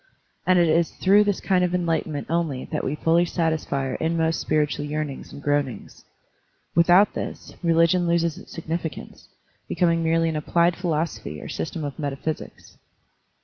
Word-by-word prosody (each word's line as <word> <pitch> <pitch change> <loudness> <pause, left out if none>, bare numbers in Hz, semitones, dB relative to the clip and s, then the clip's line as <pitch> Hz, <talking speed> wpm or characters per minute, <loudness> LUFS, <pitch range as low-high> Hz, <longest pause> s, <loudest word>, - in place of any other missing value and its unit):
And 185 0 +5
it 175 -1 +4
is 165 +1 +2
through 205 +2 +4
this 205 -2 0
kind 185 -1 +2
of 180 0 +1
enlighten 165 -3 -1
ment 145 - -4
only 160 -5 -1
that - - -2
we 140 - -1
fully 165 +2 +3
satisfy 160 -5 -1
our 130 - -3
inmost 165 0 0
spir 155 -1 +2
itual 145 0 -5
yearnings 150 -2 -4
and 140 - -10
groanings. 145 -3 -2 0.7
Without 175 +4 +5
this, - - -6
religion 170 +1 +3
loses 170 -1 +1
its - - -14
significance, 165 0 -6 0.4
becoming 170 -2 +2
merely 165 0 +2
an 160 - -3
applied 170 +3 +2
philosophy 160 - -3
or - - -8
system 150 - -4
of 145 0 -5
metaphysics. 145 +2 -5
165 Hz, 160 wpm, -24 LUFS, 150-170 Hz, 0.7 s, And